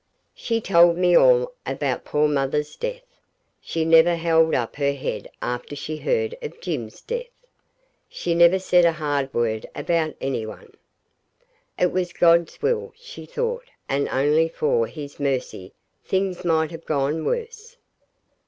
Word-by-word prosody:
She 230 Hz, -1 st, -2 dB
told 170 Hz, -3 st, +5 dB
me 180 Hz, -1 st, +3 dB
all -, -, +5 dB
about -, -, -2 dB
poor 150 Hz, +1 st, +2 dB
mother's 150 Hz, +1 st, -1 dB
death. -, -, -5 dB, 0.6 s
She 165 Hz, -1 st, -2 dB
never 165 Hz, +1 st, +6 dB
held 165 Hz, -1 st, +3 dB
up 120 Hz, 0 st, -2 dB
her 140 Hz, -1 st, +1 dB
head 140 Hz, -, -5 dB
after 125 Hz, +4 st, -4 dB
she 155 Hz, +2 st, -5 dB
heard 460 Hz, -, -1 dB
of 460 Hz, -, -7 dB
Jim's 130 Hz, -12 st, -5 dB
death. 485 Hz, +1 st, -5 dB, 0.8 s
She 170 Hz, -, -2 dB
never 170 Hz, +2 st, +6 dB
said 180 Hz, -2 st, +3 dB
a 170 Hz, -1 st, +4 dB
hard 145 Hz, -3 st, -2 dB
word 110 Hz, -3 st, -1 dB
about 165 Hz, -2 st, -1 dB
any 135 Hz, -4 st, -2 dB
one. 110 Hz, -, -10 dB, 1.0 s
It 180 Hz, -, +2 dB
was 180 Hz, -1 st, -2 dB
God's 170 Hz, -1 st, +3 dB
will, 460 Hz, 0 st, 0 dB
she 485 Hz, +2 st, -11 dB
thought, 485 Hz, +1 st, -3 dB, 0.2 s
and 140 Hz, +1 st, 0 dB
only 150 Hz, +4 st, +2 dB
for 130 Hz, -8 st, 0 dB
His 145 Hz, 0 st, -9 dB
mercy 130 Hz, -9 st, -3 dB, 0.3 s
things 190 Hz, -1 st, -1 dB
might 160 Hz, -2 st, +1 dB
have 165 Hz, 0 st, -10 dB
gone 150 Hz, +2 st, -1 dB
worse. 470 Hz, 0 st, -4 dB
165 Hz, 145 wpm, -23 LUFS, 145-195 Hz, 1.0 s, never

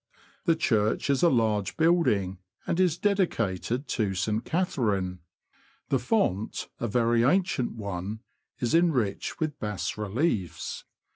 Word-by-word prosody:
The 165 Hz, -3 st, +4 dB
church 110 Hz, -4 st, +1 dB
is 135 Hz, -, +1 dB
a 175 Hz, -, +6 dB
large 110 Hz, -6 st, +1 dB
building, 130 Hz, -, +2 dB, 0.3 s
and 170 Hz, -, -1 dB
is 180 Hz, -3 st, +3 dB
dedicated 135 Hz, -, 0 dB
to 100 Hz, -4 st, 0 dB
St. 105 Hz, +5 st, 0 dB
Catherine. 105 Hz, -, -1 dB, 0.7 s
The -, -, +2 dB
font, 100 Hz, +4 st, 0 dB
a 120 Hz, -, -1 dB
very 115 Hz, +1 st, +2 dB
ancient 175 Hz, -2 st, +2 dB
one, 100 Hz, 0 st, -5 dB, 0.4 s
is 120 Hz, -, -1 dB
enriched 145 Hz, -, +1 dB
w^ith 155 Hz, -2 st, -2 dB
bas 105 Hz, -2 st, -3 dB
reliefs. 105 Hz, -, -2 dB
115 Hz, 125 wpm, -27 LUFS, 100-160 Hz, 0.7 s, a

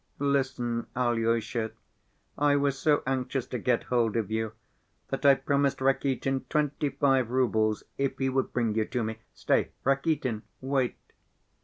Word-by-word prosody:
Listen, 135 Hz, -4 st, 0 dB
Alyosha. 115 Hz, -2 st, 0 dB, 0.6 s
I 145 Hz, 0 st, +3 dB
was 140 Hz, -1 st, +2 dB
so 150 Hz, -2 st, +3 dB
anxious 130 Hz, 0 st, -1 dB
to 125 Hz, -, -4 dB
get 120 Hz, +2 st, +1 dB
hold 115 Hz, -3 st, +1 dB
of 110 Hz, -3 st, -1 dB
you 110 Hz, -1 st, -1 dB, 0.6 s
that -, -, -3 dB
I 140 Hz, -, +8 dB
promised 140 Hz, 0 st, +1 dB
Rakitin 135 Hz, 0 st, +1 dB
twenty‐five 140 Hz, -4 st, +1 dB
roubles 110 Hz, -4 st, +1 dB, 0.2 s
if 140 Hz, -1 st, 0 dB
he 135 Hz, -, 0 dB
would 130 Hz, 0 st, 0 dB
bring 115 Hz, -3 st, 0 dB
you 110 Hz, 0 st, +1 dB
to 120 Hz, +1 st, -2 dB
me. 110 Hz, 0 st, -4 dB, 0.2 s
Stay, -, -, +1 dB
Rakitin, 135 Hz, -4 st, +1 dB, 0.2 s
wait!" 130 Hz, -2 st, 0 dB
130 Hz, 140 wpm, -28 LUFS, 115-140 Hz, 0.6 s, I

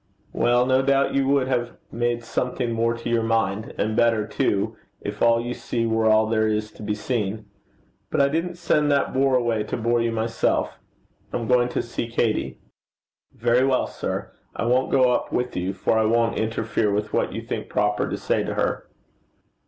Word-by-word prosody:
'Well, 120 Hz, +1 st, +3 dB
no 130 Hz, 0 st, +3 dB
doubt 135 Hz, 0 st, +2 dB
you 135 Hz, -1 st, +1 dB
would 140 Hz, -2 st, +2 dB
have 120 Hz, -2 st, -2 dB
made 120 Hz, 0 st, -1 dB
something 125 Hz, +1 st, -2 dB
more 115 Hz, +1 st, +1 dB
to 115 Hz, -, -7 dB
your 115 Hz, -1 st, +2 dB
mind 110 Hz, -2 st, -1 dB
and 110 Hz, +1 st, -1 dB
better, 115 Hz, -2 st, +3 dB
too, 100 Hz, -2 st, 0 dB, 0.2 s
if 105 Hz, 0 st, -6 dB
all 115 Hz, 0 st, +5 dB
you 120 Hz, +1 st, -3 dB
see 115 Hz, -2 st, -2 dB
were 110 Hz, 0 st, +1 dB
all 110 Hz, 0 st, +5 dB
there 110 Hz, 0 st, +1 dB
is 105 Hz, 0 st, -1 dB
to -, -, -14 dB
be 105 Hz, 0 st, -2 dB
seen. 110 Hz, -2 st, -2 dB, 0.6 s
But -, -, -1 dB
I 140 Hz, -, +5 dB
didn't 165 Hz, +5 st, -2 dB
send 150 Hz, -3 st, +1 dB
that 140 Hz, -1 st, +1 dB
bore 135 Hz, 0 st, +3 dB
away 120 Hz, -3 st, +1 dB
to -, -, -3 dB
bore 120 Hz, +1 st, +1 dB
you 115 Hz, 0 st, 0 dB
myself. 115 Hz, 0 st, -1 dB, 0.5 s
I'm 115 Hz, -2 st, -3 dB
going 125 Hz, -1 st, +3 dB
to -, -, -2 dB
see 120 Hz, 0 st, -4 dB
Katey.' 110 Hz, -, -1 dB, 0.8 s
'Very 120 Hz, +2 st, +2 dB
well, 130 Hz, -1 st, +2 dB
sir. -, -, -4 dB, 0.2 s
I -, -, -2 dB
won't 125 Hz, +2 st, +2 dB
go 130 Hz, -1 st, +4 dB
up -, -, -1 dB
with 125 Hz, 0 st, -1 dB
you, 90 Hz, +1 st, -1 dB
for 100 Hz, +3 st, 0 dB
I 110 Hz, -, +2 dB
won't 115 Hz, +1 st, +2 dB
interfere 110 Hz, -1 st, -1 dB
with 105 Hz, +1 st, -2 dB
what -, -, +1 dB
you -, -, -5 dB
think -, -, -5 dB
proper 105 Hz, 0 st, 0 dB
to -, -, -3 dB
say -, -, 0 dB
to -, -, -4 dB
her.' -, -, -1 dB
115 Hz, 195 wpm, -23 LUFS, 110-125 Hz, 0.8 s, all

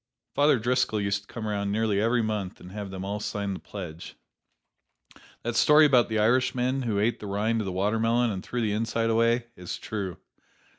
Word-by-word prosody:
Father 145 Hz, -1 st, +4 dB
Driscoll 120 Hz, -1 st, +1 dB
used 100 Hz, 0 st, 0 dB
to 100 Hz, -, -25 dB
come 110 Hz, -2 st, -6 dB
around 100 Hz, -1 st, -1 dB
nearly 105 Hz, -1 st, +1 dB
every 115 Hz, +1 st, +2 dB
month 105 Hz, -4 st, -3 dB
and 90 Hz, -, -11 dB
have 105 Hz, -1 st, -6 dB
them 95 Hz, 0 st, -6 dB
all 100 Hz, +1 st, -3 dB
sign 100 Hz, -1 st, -3 dB
the -, -, -6 dB
pledge. 85 Hz, -5 st, -8 dB, 1.3 s
That 120 Hz, 0 st, -2 dB
story 150 Hz, +5 st, +6 dB
about 125 Hz, -5 st, +4 dB
the 110 Hz, -, 0 dB
Irishman 125 Hz, +3 st, +2 dB
who 115 Hz, -5 st, -1 dB
ate 115 Hz, +3 st, +1 dB
the 105 Hz, -, -7 dB
rind 110 Hz, +3 st, 0 dB
of -, -, -4 dB
the 95 Hz, -, -3 dB
watermelon 115 Hz, +5 st, +1 dB
"and 95 Hz, -2 st, -5 dB
threw 125 Hz, -, -3 dB
the 105 Hz, -2 st, 0 dB
inside 115 Hz, +1 st, 0 dB
away," 115 Hz, +1 st, +2 dB
is 90 Hz, -1 st, -6 dB
true. 100 Hz, -5 st, -5 dB
110 Hz, 195 wpm, -27 LUFS, 100-120 Hz, 1.3 s, story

